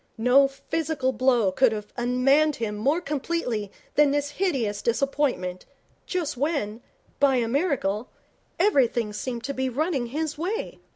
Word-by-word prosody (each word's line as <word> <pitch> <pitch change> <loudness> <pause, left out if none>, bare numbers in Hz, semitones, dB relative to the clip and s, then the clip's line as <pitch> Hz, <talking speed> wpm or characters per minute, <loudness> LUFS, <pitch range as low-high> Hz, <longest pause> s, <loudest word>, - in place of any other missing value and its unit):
No 250 +4 +5
physical 275 -1 -2
blow 245 -7 +3
could 255 +5 +3
have 210 -1 -7
unmanned 270 +5 +3
him 225 -2 -3
more 280 +11 +1
completely 275 - -2 0.2
than 295 -1 +5
this 290 0 0
hideous 270 - -1
disappointment 235 -8 -1 0.4
just 350 -7 -2
when, 250 -6 -2 0.4
by 280 -2 +4
a 240 -2 +1
miracle, 245 - 0 0.5
everything 250 - +2
seemed 235 +2 -4
to 280 - -3
be 260 -1 -1
running 275 -1 -1
his 305 +4 -3
way. 410 +8 -3
265 Hz, 135 wpm, -25 LUFS, 235-295 Hz, 0.5 s, No